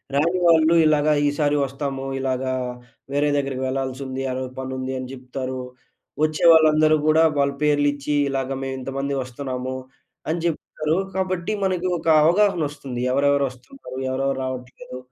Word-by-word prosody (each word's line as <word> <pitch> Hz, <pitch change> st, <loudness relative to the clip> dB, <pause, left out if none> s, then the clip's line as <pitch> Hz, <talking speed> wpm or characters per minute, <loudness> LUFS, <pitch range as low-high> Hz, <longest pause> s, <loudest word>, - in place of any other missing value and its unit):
రాని 170 Hz, +6 st, +2 dB
వాళ్ళు 160 Hz, 0 st, +5 dB
ఇలాగ 155 Hz, -1 st, +3 dB, 0.2 s
ఈ -, -, +4 dB
సారి 145 Hz, -1 st, +2 dB
వస్తాము 135 Hz, 0 st, -4 dB
ఇలాగా 130 Hz, 0 st, -1 dB, 0.6 s
వేరే 145 Hz, +1 st, +1 dB
దగ్గరికి 135 Hz, -2 st, -2 dB
వెళ్ళాల్సి 130 Hz, 0 st, -3 dB
ఉంది 130 Hz, 0 st, -4 dB
ఆ -, -, -2 dB
రోజు 130 Hz, -1 st, -4 dB
పనుంది 130 Hz, 0 st, -4 dB
అని 130 Hz, -, -5 dB
చెప్తారు. 130 Hz, 0 st, -5 dB, 0.6 s
వచ్చే 155 Hz, +1 st, +1 dB
వాళ్ళందరూ 155 Hz, -1 st, +5 dB
కూడా 155 Hz, +1 st, +5 dB, 0.2 s
వాళ్ళ 140 Hz, 0 st, +2 dB
పేర్లు 145 Hz, -1 st, +3 dB
ఇచ్చి, 145 Hz, +1 st, -3 dB
"ఇలాగ 135 Hz, -1 st, -2 dB
మేము 135 Hz, 0 st, -3 dB
ఇంతమంది 135 Hz, +2 st, -3 dB
వస్తున్నాము" 130 Hz, 0 st, -5 dB, 0.5 s
అని 165 Hz, -, 0 dB
చెప్తారు. 155 Hz, 0 st, -1 dB, 0.2 s
కాబట్టి 185 Hz, 0 st, -1 dB
మనకి 185 Hz, -1 st, 0 dB
ఒక -, -, -8 dB, 0.2 s
అవగాహన 185 Hz, +1 st, +3 dB
వస్తుంది 135 Hz, -4 st, -6 dB
ఎవరెవరు 140 Hz, +1 st, +3 dB
వస్తున్నారు, 130 Hz, -, -12 dB
ఎవరెవరు 135 Hz, +1 st, -1 dB
రావట్లేదు. 125 Hz, -, -7 dB
140 Hz, 145 wpm, -23 LUFS, 130-155 Hz, 0.6 s, వాళ్ళు